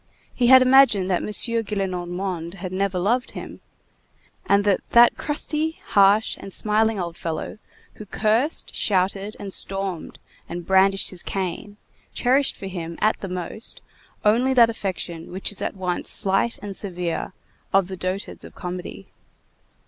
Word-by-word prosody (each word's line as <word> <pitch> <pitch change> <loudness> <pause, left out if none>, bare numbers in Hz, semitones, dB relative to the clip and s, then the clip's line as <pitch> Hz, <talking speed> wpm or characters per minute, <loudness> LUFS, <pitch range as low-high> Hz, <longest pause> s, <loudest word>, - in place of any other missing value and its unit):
He 245 - +1
had 260 +1 +8
imagined 255 -8 +5
that 180 - +1
M. - - -4
Gillenormand 190 -5 -2
had 185 -1 -6
never 190 0 -1
loved 235 +8 0
him, - - -8 0.9
and 200 0 +4
that 200 -2 +2
that 240 0 +6
crusty, 310 +2 -2
harsh, 200 +2 +4
and 195 - -9
smiling 215 +1 +2
old 170 -2 -4
fellow 165 +5 -5 0.3
who 215 - -11
cursed, 225 +10 0
shouted, 195 +1 0
and 195 -2 -5
stormed 195 -3 -3 0.3
and 175 0 -6
brandished 195 0 +3
his 180 -2 -6
cane, 195 +2 -4 0.4
cherished 265 +3 +3
for - - -9
him, 170 -3 -6
at 215 - +2
the 195 - -5
most, 180 +5 -6 0.5
only 245 +5 +3
that 235 -2 +6
affection, 180 -6 -5
which 190 +3 -2
is 205 - -4
at - - -3
once 180 -2 -2
slight 195 +4 +1
and 200 -1 -6
severe, 180 -2 -4 0.4
of 195 -2 +3
the 190 - -6
dotards 185 +2 -4
of - - -12
comedy. 180 -1 -7
195 Hz, 150 wpm, -23 LUFS, 185-220 Hz, 0.9 s, had